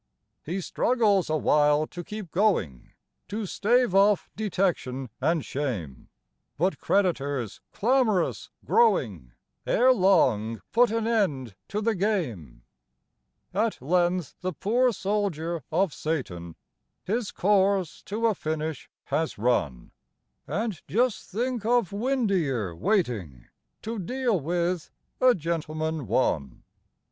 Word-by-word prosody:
He 180 +5 -3
struggles 210 -3 +2
awhile 150 -1 +3
to 175 +2 -8
keep 210 -2 -7
going, 170 - 0 0.3
To 210 +1 -3
stave 235 +3 +2
off 200 0 +3
detection 175 - -1
and 160 +2 +1
shame; 105 - -4 0.5
But 185 +5 0
creditors, 145 - 0
clamorous 225 -5 +1 0.2
growing, 110 - +2 0.3
Ere 255 +2 +5
long 130 - +3
put 240 +1 +4
an 225 0 -1
end 155 - 0
to 210 - -3
the 225 +1 +1
game. 125 - -2 0.9
At 215 +3 0
length 175 +2 +1
the 185 0 -2
poor 245 - +2
soldier 190 -6 -2
of 190 -5 +1
Satan 90 - -4 0.5
His 220 +2 -1
course 195 -3 +1
to 220 +3 -2
a 225 - +4
finish 155 -3 -4
has 160 0 -2
run 80 - 0 0.6
And 205 +1 -2
just 240 +2 0
think 240 +3 -2
of 235 -4 +2
Windeyer 195 - 0
waiting 105 - -1 0.3
To 225 0 -4
deal 240 +1 0
with 170 +2 -1 0.3
"A 255 -1 +5
Gentleman, 160 - -3
One"! 65 -3 0
180 Hz, 110 wpm, -26 LUFS, 145-215 Hz, 0.9 s, Ere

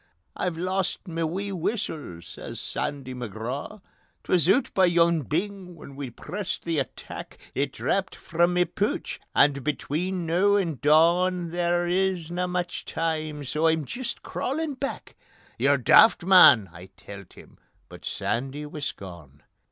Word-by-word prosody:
"I've 175 -3 -2
lost 185 +2 -2
ma 165 -1 -2
wee 190 +5 -3
whustle," 165 - -3
says - - -8
Sandy 135 -3 -4
McGraw. 125 - -6 0.4
"'Twas 170 -4 +2
oot 235 +8 +3
by 190 - +5
yon 170 -2 +3
bing 180 +5 -3
where 150 - -11
we 135 -1 -6
pressed 185 - -5
the 165 -3 0
attack, 135 - -7 0.2
It - - -1
drapped - - -1
frae 170 +1 +1
ma 180 0 +2
pooch, 205 +4 -2 0.2
and 140 -2 +4
between 170 +5 -2
noo 185 +5 +3
and 170 -8 -1
dawn 170 +4 +3
There 175 0 +1
isna 180 -1 0
much 180 -1 -3
time 155 -2 -2
so 150 +4 0
I'm 160 -2 +1
jist 240 - -5
crawlin' 295 +3 -2
back... 275 +1 -5 0.2
." - - -29
"Ye're 140 +1 +4
daft, 170 - +6
man!" 135 - +7
I 90 +2 -11
telt 100 -1 -11
him, - - -16 0.3
but - - -13
Sandy 135 +5 -3
wis 150 -1 -4
gone. 85 -7 -12
165 Hz, 145 wpm, -26 LUFS, 140-185 Hz, 0.4 s, man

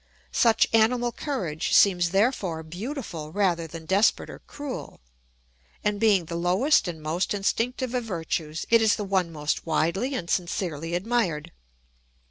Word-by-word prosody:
Such 230 -2 +4
animal 240 +2 +3
courage 190 - -3
seems 180 -3 +5
therefore 195 -5 0
beautiful 175 - -6
rather 175 -4 0
than 160 0 -9
desperate 195 +5 +2
or - - -10
cruel, 285 -3 -7 0.8
and 210 -1 0
being 205 -5 +3
the 170 - -6
lowest 185 - +2
and 170 -2 -5
most 165 +6 -1
instinctive 240 +5 -1
of 250 -1 0
virtues 165 -4 -3
it 230 -1 +6
is 220 -2 +4
the 210 - -4
one 190 -3 0
most 150 +1 -3
widely 180 - 0
and 200 -9 -4
sincerely 170 -3 -2
admired. 180 -6 -1
190 Hz, 140 wpm, -26 LUFS, 165-225 Hz, 0.8 s, it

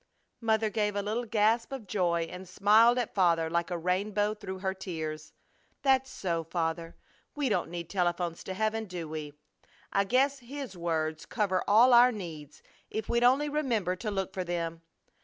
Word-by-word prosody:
Mother 220 -1 +1
gave 210 -2 0
a 205 - -1
little 220 +4 -2
gasp 225 +3 +2
of 265 -5 -6
joy 175 -4 +1
and 180 +2 -8
smiled 215 +5 +5
at 245 -3 -2
Father 170 -4 +2
like 170 +1 0
a 175 - -2
rainbow 200 +4 0
through 195 -3 -7
her 190 0 -2
tears. 160 -5 -6 0.5
"That's 265 -1 +3
so, 170 -3 -2
Father! 165 0 -3 0.4
We 290 -3 0
don't 180 -6 0
need 170 -1 -5
telephones 175 -2 -1
to 190 - -5
heaven, 220 +2 -1
do 180 -4 -6
we? 155 -1 -6 0.6
I 200 0 +3
guess 270 +6 +2
His 265 -3 -7
words 160 -2 -2
cover 200 -5 0
all 235 +5 +6
our 245 +1 +8
needs 160 - -8 0.3
if 220 -1 -4
we'd 235 0 +2
only 265 +4 +4
remember 240 - 0
to 215 - -4
look 195 -2 -3
for 185 - -2
them. 165 -2 -3
195 Hz, 175 wpm, -29 LUFS, 170-225 Hz, 0.6 s, our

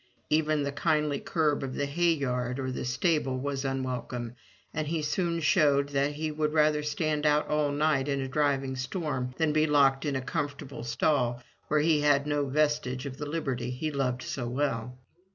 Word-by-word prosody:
Even 155 -1 +2
the 140 - -1
kindly 150 -1 +1
curb 155 -4 0
of 130 -2 -4
the 145 - 0
hay 170 +4 +2
yard 125 -3 -2
or 130 -1 -2
the 130 - -4
stable 135 0 +1
was 135 +1 -3
unwelcome, 125 -3 -3 0.4
and 155 0 -2
he 160 0 -1
soon 170 +2 0
showed 145 -4 +3
that 140 +1 0
he 155 +1 -3
would 150 0 -1
rather 150 -1 +3
stand 150 0 -1
out 150 0 +3
all 150 -1 +1
night 145 -2 +1
in 140 -1 0
a 135 - -2
driving 135 -1 0
storm 130 -2 -3
than 160 -2 +2
be 155 0 +3
locked 140 -2 +4
in 145 -3 -1
a 130 - -1
comfortable 140 0 -4
stall 120 0 0 0.2
where 150 -1 +2
he 155 -1 +3
had 145 -1 +3
no 145 -1 0
vestige 150 -3 0
of 135 -1 -6
the 150 - -5
liberty 135 -6 -2
he 140 +5 -3
loved 130 -3 -1
so 125 -3 -4
well. 125 -2 -2
145 Hz, 190 wpm, -29 LUFS, 130-150 Hz, 0.4 s, locked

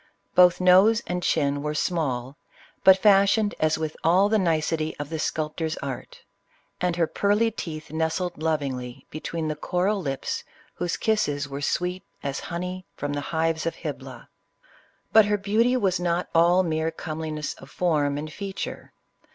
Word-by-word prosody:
Both 180 -1 +6
nose 190 +5 +5
and 180 0 -2
chin 145 -4 +1
were 150 +1 -3
small, 140 -6 -1 0.5
but 190 0 +8
fashioned 205 +1 +4
as 155 0 +2
with 155 -1 -3
all 185 +5 +4
the 220 0 +3
nicety 160 -2 0
of 145 0 -5
the 160 - -3
sculptor's 155 +1 -2
art; 135 -3 -7 0.6
and 180 -1 +1
her 170 -1 +2
pearly 205 +6 +1
teeth 155 -8 -7
nestled 160 +1 -2
lovingly 135 -6 -2
between 155 +1 -4
the 155 - -2
coral 185 +6 0
lips 135 -4 -3 0.3
whose 175 -1 -2
kisses 145 -10 0
were 140 0 -6
sweet 180 +5 -1 0.2
as 140 -1 -2
honey 180 +2 -5
from 145 0 -3
the 145 - -2
hives 160 0 0
of 165 - -2
Hybla. - - -7 0.9
But 220 -1 +8
her 205 0 +1
beauty 220 +6 +2
was 190 -6 +1
not 175 0 -1
all 175 +3 +5
mere 160 -1 0
comeliness 155 -2 -4
of 135 - -12
form 150 -5 +1
and 155 +1 -6
feature. 195 -1 -6
165 Hz, 155 wpm, -25 LUFS, 150-185 Hz, 0.9 s, but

